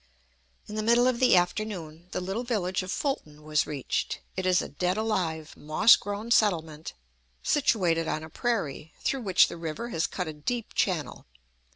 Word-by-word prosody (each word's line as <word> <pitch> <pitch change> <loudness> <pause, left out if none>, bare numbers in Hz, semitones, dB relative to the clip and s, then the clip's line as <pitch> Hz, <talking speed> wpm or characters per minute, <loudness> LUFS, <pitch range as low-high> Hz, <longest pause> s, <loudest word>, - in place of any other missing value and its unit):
In 210 - -8
the 215 - -1
middle 235 +3 +4
of 255 -2 +2
the 255 -6 +5
afternoon 175 -3 -2
the - - -3
little 195 +6 -3
village 195 -7 -1
of 185 0 -5
Fulton 155 - -3
was 150 0 +1
reached. 145 -4 -2 0.2
It 185 0 -1
is 180 -1 +4
a - - -3
dead 180 +6 -1
alive, 175 -8 -2
moss 155 +10 +5
grown 205 +3 -5
settlement, 165 -8 +1 0.5
situated 180 - +2
on 155 - -2
a 160 - -9
prairie, 160 - -2
through 270 - -1
which 190 -5 +5
the - - -7
river 165 +8 -5
has 165 -7 0
cut 180 -3 -4
a 155 - -4
deep 225 +10 -4
channel. 175 - -1
185 Hz, 175 wpm, -28 LUFS, 160-220 Hz, 0.5 s, the